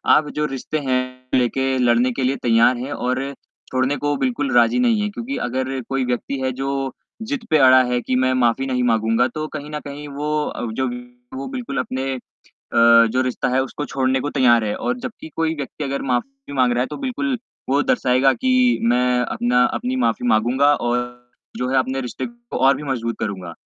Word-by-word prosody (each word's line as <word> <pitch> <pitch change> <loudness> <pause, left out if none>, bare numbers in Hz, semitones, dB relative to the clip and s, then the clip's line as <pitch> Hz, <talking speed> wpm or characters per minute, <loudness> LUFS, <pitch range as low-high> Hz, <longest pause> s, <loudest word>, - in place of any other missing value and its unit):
आप 150 -1 +2
जो 150 - +2
रिश्ते 135 +2 -3
हैं, 130 0 -2
लेके 130 +2 +1
लड़ने 120 0 +3
के 130 +2 -3
लिए 130 +2 +1
तैयार 115 +1 +4
है 130 +4 -5
और 130 0 -1 0.5
छोड़ने 130 +2 +1
को 145 0 -1
बिल्कुल 135 +1 -1
राजी 120 - +4
नहीं 235 -4 +3
है। 210 - -1
क्योंकि 240 +6 -5
अगर 130 +2 -2
कोई 135 -1 0
व्यक्ति 125 +2 -2
है 130 0 0
जो 135 +1 -2 0.3
जिद 240 +1 -4
पे 155 - +4
अड़ा 130 -2 +7
है 125 0 0
कि 130 - -1
मैं 130 0 +2
माफ़ी 125 +1 +2
नहीं 125 -1 0
माँगूँगा, 115 +1 +2
तो 155 +5 -5
कहीं 150 0 -6
न 150 - -3
कहीं 145 +1 -7
वो 145 +2 -3
अव 115 -1 -4
जब 130 -1 0 0.4
वो 135 +1 -5
बिल्कुल 235 - -5
अपने 130 +1 -2
अ, - - -6 0.6
जो 115 +1 +5
रिश्ता 130 -1 -1
है 130 +1 +2
उसको 145 +3 -5
छोड़ने 130 -1 0
को 145 - -2
तैयार 120 -5 +4
है 105 - -1
और 245 - -2
जबकि 235 -10 -8
कोई 165 0 0
व्यक्ति 145 +1 -6
अगर 140 0 -2
माफ़ी 135 +2 -3
माँग 130 -3 +3
रहा 120 - +1
है, - - 0
तो - - -7
बिल्कुल 265 0 -2 0.3
वो 140 +2 +3
दर्शाएगा 135 - +3
कि 255 - +2
मैं 125 0 +2
अपना 125 0 +1
अपनी 250 +2 -3
माफ़ी 115 +2 0
माँगूँगा 125 +6 +3 0.2
और 120 0 0 0.5
जो 125 - -1
है 135 - +1
अपने 130 +1 0
रिश्ते 125 - -5
को 240 0 -8
और 135 - +6
भी - - -7
मजबूत 120 -5 -2
करूँगा। 95 -4 -4
130 Hz, 205 wpm, -21 LUFS, 125-145 Hz, 0.6 s, अड़ा